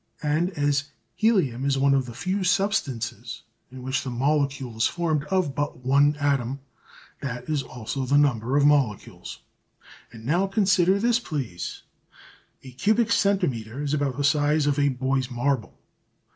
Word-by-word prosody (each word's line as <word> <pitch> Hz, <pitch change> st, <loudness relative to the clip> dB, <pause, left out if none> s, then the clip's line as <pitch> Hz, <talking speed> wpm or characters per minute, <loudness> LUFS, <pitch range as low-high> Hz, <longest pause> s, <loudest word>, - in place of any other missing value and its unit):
And 155 Hz, +4 st, +1 dB
as 145 Hz, 0 st, +1 dB, 0.3 s
helium 180 Hz, -, +1 dB
is 140 Hz, -1 st, +1 dB
one 140 Hz, +1 st, +3 dB
of 135 Hz, -2 st, +1 dB
the 120 Hz, -, -9 dB
few 185 Hz, +8 st, -2 dB
substances 135 Hz, -, -1 dB, 0.3 s
in 130 Hz, -1 st, -10 dB
which 130 Hz, +1 st, -1 dB
the 135 Hz, -, -4 dB
molecule 135 Hz, -1 st, -1 dB
is 110 Hz, -, +3 dB
formed 160 Hz, -4 st, -1 dB
of 175 Hz, -3 st, 0 dB
but 145 Hz, -1 st, -3 dB
one 140 Hz, +3 st, +4 dB
atom, 140 Hz, -3 st, -1 dB, 0.6 s
that 125 Hz, -3 st, -5 dB
is 155 Hz, -3 st, 0 dB
also 130 Hz, +1 st, -5 dB
the 140 Hz, +3 st, +3 dB
number 130 Hz, -2 st, +2 dB
of 145 Hz, -, +4 dB
molecules. 140 Hz, -8 st, 0 dB, 0.7 s
And 115 Hz, -1 st, -12 dB
now 175 Hz, +8 st, +1 dB
consider 195 Hz, -2 st, +3 dB
this, 235 Hz, +3 st, +2 dB
please. 135 Hz, -, -5 dB, 0.8 s
A 130 Hz, -, -10 dB
cubic 215 Hz, -, +1 dB
centimetre 140 Hz, -, 0 dB
is 145 Hz, 0 st, -2 dB
about 140 Hz, -3 st, -1 dB
the 145 Hz, -, -1 dB
size 150 Hz, +1 st, +2 dB
of 145 Hz, 0 st, +1 dB
a 145 Hz, 0 st, +3 dB
boy's 130 Hz, 0 st, -1 dB
marble. 125 Hz, -4 st, -2 dB
140 Hz, 155 wpm, -25 LUFS, 130-155 Hz, 0.8 s, one